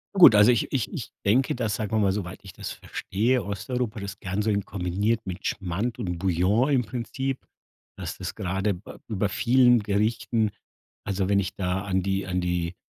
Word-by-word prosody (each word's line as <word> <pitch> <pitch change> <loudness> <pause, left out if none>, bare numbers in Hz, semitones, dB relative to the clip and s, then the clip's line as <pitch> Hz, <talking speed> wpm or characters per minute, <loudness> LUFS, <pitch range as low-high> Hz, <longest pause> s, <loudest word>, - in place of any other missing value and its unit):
Gut, 170 - +9
also 105 +4 +7
ich 120 - 0
ich 130 -5 0
ich - - -5 0.2
denke, 125 +7 +3
dass, 115 -4 -1
sagen 105 0 -3
wir 110 - +2
mal, 100 -2 +3
soweit 95 -2 -4
ich 95 - -10
das - - -6
verstehe, 115 +4 -1
Osteuropa 105 +2 -3
das 100 -1 -6
gern 95 +2 -2
so 110 - 0
in 100 -2 0
kombiniert 100 +4 -1
mit 95 0 -6
Schmand 100 +6 -2
und 90 -6 -2
Bouillon 95 - +2
im 135 -4 +3
Prinzip, 130 +3 -3 0.6
dass - - -5
das - - -5
gerade 95 +2 -1
ba 90 +4 -11
über 105 -2 0
vielen 125 +4 +4
Gerichten 105 +1 0 0.5
also, 95 -1 -1
wenn 100 0 +4
ich 95 -1 -3
da 95 0 -1
an 95 -2 0
die 95 0 -1
an 90 0 0
die, 90 0 -1
100 Hz, 190 wpm, -26 LUFS, 95-115 Hz, 0.6 s, Gut